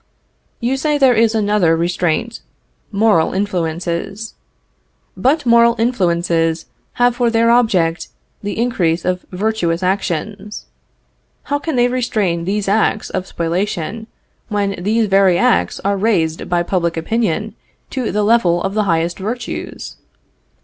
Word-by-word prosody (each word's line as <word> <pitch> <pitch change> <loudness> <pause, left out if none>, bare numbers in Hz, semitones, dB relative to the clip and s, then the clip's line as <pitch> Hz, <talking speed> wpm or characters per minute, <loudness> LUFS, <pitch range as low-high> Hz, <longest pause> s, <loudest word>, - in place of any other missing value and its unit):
You 255 +3 0
say 295 +2 0
there 265 -3 +5
is 225 0 +2
another 205 -6 +2
restraint 175 +6 -1 0.5
moral 200 -5 +2
influences. 185 +2 -3 0.8
But 280 +3 +1
moral 235 0 +5
influences 170 -7 0 0.3
have 245 0 +2
for 240 -1 +2
their 230 0 +3
object 185 -9 +2 0.3
the 205 +1 -4
increase 180 -8 0
of 180 0 -2
virtuous 185 -3 -1
actions. 200 +2 -3 0.8
How 285 0 -1
can 315 0 -3
they 245 0 +4
restrain 215 -9 -1
these 200 +2 -1
acts 215 +1 +1
of 185 - -3
spoliation 180 +5 -3 0.4
when 205 -2 -1
these 220 +4 +1
very 195 -3 +4
acts 85 - +1
are 200 0 +1
raised 180 -7 0
by 175 -1 +1
public 170 -2 -1
opinion 215 +3 -1 0.4
to 255 -4 -2
the 210 0 0
level 205 -6 +3
of 195 - -2
the 215 0 +1
highest 170 0 0
virtues? 230 +5 -5
200 Hz, 130 wpm, -17 LUFS, 175-230 Hz, 0.8 s, there